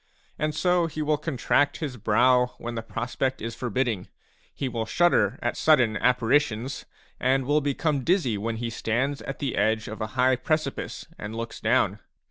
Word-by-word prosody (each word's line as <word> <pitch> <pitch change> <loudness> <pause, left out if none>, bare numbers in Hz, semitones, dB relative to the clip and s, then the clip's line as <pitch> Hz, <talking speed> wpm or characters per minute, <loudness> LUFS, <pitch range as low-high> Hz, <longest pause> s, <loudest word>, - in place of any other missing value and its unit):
And 155 0 -1
so 180 -2 +2
he 155 -1 -4
will 150 0 +1
contract 145 -1 +1
his 145 -6 -4
brow 125 +3 +3
when 120 0 -5
the 115 - -3
prospect 120 +3 -2
is 115 +1 -4
forbidding, 120 -4 -2 0.5
will 115 -4 -2
shudder 140 - +3
at 120 - 0
sudden 130 -9 +4
apparitions, 125 +1 +1 0.3
and 130 +1 +2
will 150 +3 +2
become 145 0 0
dizzy 165 - +2
when 110 +3 -2
he 115 +1 -3
stands 125 +5 -1
at 135 - -6
the 140 -3 -2
edge 110 +1 +1
of 110 +1 -7
a 110 - -1
high 130 0 +4
precipice 155 0 -2
and 105 +2 -6
looks 115 0 -5
down. - - +2
125 Hz, 165 wpm, -26 LUFS, 115-145 Hz, 0.5 s, sudden